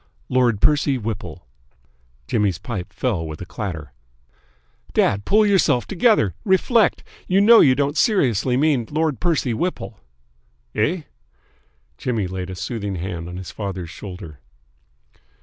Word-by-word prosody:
"Lord 120 Hz, -5 st, +2 dB
Percy 145 Hz, -2 st, +3 dB
Whipple." 105 Hz, -, -6 dB, 0.8 s
Jimmy's 105 Hz, -6 st, +1 dB
pipe 100 Hz, -2 st, -6 dB
fell 110 Hz, -10 st, -1 dB
with 80 Hz, 0 st, -7 dB
a 90 Hz, -, -6 dB
clatter. 85 Hz, -7 st, -6 dB, 1.0 s
"Dad, 100 Hz, +1 st, +2 dB
pull 215 Hz, +1 st, +4 dB
yourself 165 Hz, -11 st, +3 dB
together! 195 Hz, -, +2 dB
Reflect! 205 Hz, +2 st, +2 dB, 0.2 s
You 185 Hz, +1 st, +3 dB
know 225 Hz, +3 st, +7 dB
you 130 Hz, -2 st, +6 dB
don't 145 Hz, +1 st, 0 dB
seriously 130 Hz, -, +2 dB
mean 140 Hz, -5 st, +2 dB
Lord 155 Hz, -2 st, -1 dB
Percy 155 Hz, -8 st, 0 dB
Whipple." 140 Hz, -, -3 dB, 0.7 s
"Eh?" 155 Hz, +11 st, 0 dB, 1.0 s
Jimmy 115 Hz, -6 st, -1 dB
laid 90 Hz, 0 st, -5 dB
a 95 Hz, -, -6 dB
soothing 100 Hz, +2 st, -4 dB
hand 85 Hz, -1 st, -5 dB
on 90 Hz, -, -7 dB
his 95 Hz, -1 st, -7 dB
father's 95 Hz, -5 st, -5 dB
shoulder. 90 Hz, -6 st, -9 dB
115 Hz, 130 wpm, -21 LUFS, 95-150 Hz, 1.0 s, know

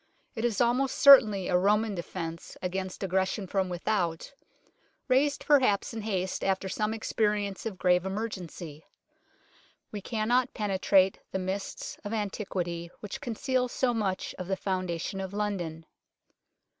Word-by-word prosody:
It 225 Hz, -, -4 dB
is 235 Hz, -4 st, 0 dB
almost 250 Hz, +3 st, +2 dB
certainly 215 Hz, -9 st, +7 dB
a 180 Hz, -, +1 dB
Roman 210 Hz, +4 st, +3 dB
defence 170 Hz, -2 st, -6 dB
against 185 Hz, +1 st, -3 dB
aggression 190 Hz, +2 st, 0 dB
from 190 Hz, 0 st, -1 dB
without, 175 Hz, +2 st, -1 dB, 0.7 s
raised 280 Hz, +2 st, +2 dB
perhaps 255 Hz, -8 st, +3 dB
in 225 Hz, -, -4 dB
haste 190 Hz, -3 st, -2 dB
after 190 Hz, 0 st, 0 dB
some 210 Hz, +3 st, -1 dB
experience 210 Hz, -2 st, -1 dB
of 200 Hz, -4 st, -6 dB
grave 180 Hz, -1 st, +3 dB
emergency. 185 Hz, -6 st, -5 dB, 1.1 s
We 205 Hz, -, -5 dB
cannot 235 Hz, +4 st, 0 dB
penetrate 195 Hz, -2 st, +3 dB
the -, -, -1 dB
mists 190 Hz, +1 st, -4 dB
of 205 Hz, +1 st, -4 dB
antiquity 185 Hz, -5 st, -3 dB
which 210 Hz, -, -6 dB
conceal 255 Hz, 0 st, 0 dB
so 245 Hz, 0 st, 0 dB
much 195 Hz, -4 st, -2 dB
of 185 Hz, -, -5 dB
the 190 Hz, 0 st, -1 dB
foundation 185 Hz, 0 st, -2 dB
of 190 Hz, 0 st, -6 dB
London. 180 Hz, -6 st, -3 dB
195 Hz, 130 wpm, -29 LUFS, 185-220 Hz, 1.1 s, certainly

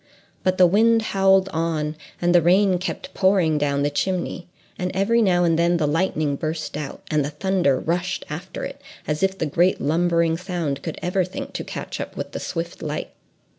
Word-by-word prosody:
But 185 Hz, 0 st, +1 dB
the 185 Hz, -, +7 dB
wind 225 Hz, +5 st, +4 dB
howled 195 Hz, 0 st, +4 dB
on, 160 Hz, -2 st, -1 dB, 0.2 s
and 175 Hz, 0 st, +2 dB
the 175 Hz, -, +6 dB
rain 185 Hz, +2 st, +4 dB
kept 185 Hz, -, -5 dB
pouring 185 Hz, -6 st, +3 dB
down 140 Hz, -1 st, +1 dB
the 145 Hz, -, +1 dB
chimney, 180 Hz, +3 st, -2 dB, 0.3 s
and 180 Hz, -1 st, -1 dB
every 225 Hz, +5 st, +3 dB
now 180 Hz, -4 st, +3 dB
and 165 Hz, -1 st, +2 dB
then 170 Hz, +1 st, +3 dB
the 155 Hz, -, +1 dB
lightning 155 Hz, -2 st, 0 dB
burst 155 Hz, +1 st, -4 dB
out, 150 Hz, -, -6 dB
and 150 Hz, -1 st, +2 dB
the 140 Hz, -, -2 dB
thunder 150 Hz, -3 st, +1 dB
rushed 180 Hz, +2 st, -2 dB
after -, -, -6 dB
it, -, -, -8 dB, 0.3 s
as 150 Hz, 0 st, -1 dB
if 195 Hz, 0 st, +1 dB
the 160 Hz, -, -1 dB
great 170 Hz, +5 st, +2 dB
lumbering 170 Hz, +1 st, +2 dB
sound 170 Hz, -6 st, -3 dB
could -, -, -5 dB
ever 180 Hz, +1 st, +1 dB
think 180 Hz, +2 st, -6 dB
to -, -, -4 dB
catch -, -, -6 dB
up -, -, -7 dB
with -, -, -5 dB
the -, -, -5 dB
swift -, -, -5 dB
light! -, -, -4 dB
175 Hz, 195 wpm, -23 LUFS, 155-190 Hz, 0.3 s, the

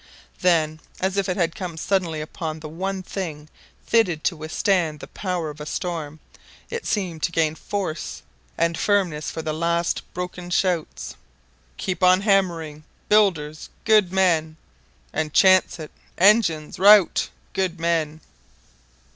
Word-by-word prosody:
Then, 160 Hz, -3 st, +2 dB, 0.2 s
as 190 Hz, +1 st, -1 dB
if 200 Hz, -1 st, 0 dB
it 180 Hz, -, -1 dB
had 170 Hz, -3 st, +1 dB
come 175 Hz, -3 st, -6 dB
suddenly 170 Hz, -3 st, -1 dB
upon 155 Hz, 0 st, -5 dB
the 155 Hz, -, -8 dB
one 190 Hz, +4 st, -4 dB
thing 155 Hz, -6 st, -6 dB, 0.4 s
fit 180 Hz, -9 st, +2 dB
to 170 Hz, -, +1 dB
withstand 160 Hz, 0 st, 0 dB
the -, -, -8 dB
power 180 Hz, -5 st, -3 dB
of 150 Hz, 0 st, -12 dB
a -, -, -5 dB
storm, 160 Hz, -4 st, -4 dB, 0.5 s
it 470 Hz, -1 st, -4 dB
seemed 180 Hz, -6 st, -2 dB
to 170 Hz, -, 0 dB
gain 160 Hz, -2 st, +1 dB
force 175 Hz, -2 st, -4 dB, 0.3 s
and 170 Hz, 0 st, +1 dB
firmness 180 Hz, -6 st, 0 dB
for 160 Hz, -, -5 dB
the 155 Hz, -, -2 dB
last 170 Hz, +1 st, 0 dB
broken 180 Hz, 0 st, -5 dB
shouts: 175 Hz, -2 st, -1 dB, 0.6 s
"Keep 185 Hz, -1 st, -3 dB
on 185 Hz, +1 st, +5 dB
hammering... 170 Hz, -7 st, 0 dB, 0.3 s
builders... 170 Hz, -8 st, +2 dB, 0.2 s
good 215 Hz, -5 st, +4 dB
men..... 165 Hz, -5 st, +1 dB, 0.6 s
And 155 Hz, -1 st, -2 dB
chance 185 Hz, -1 st, +5 dB
it... 155 Hz, -2 st, -8 dB, 0.3 s
engines.... 185 Hz, -6 st, +3 dB
Rout... 205 Hz, -1 st, +6 dB, 0.2 s
good 185 Hz, -3 st, -1 dB
man." 160 Hz, -2 st, -1 dB
170 Hz, 140 wpm, -23 LUFS, 155-190 Hz, 0.6 s, Rout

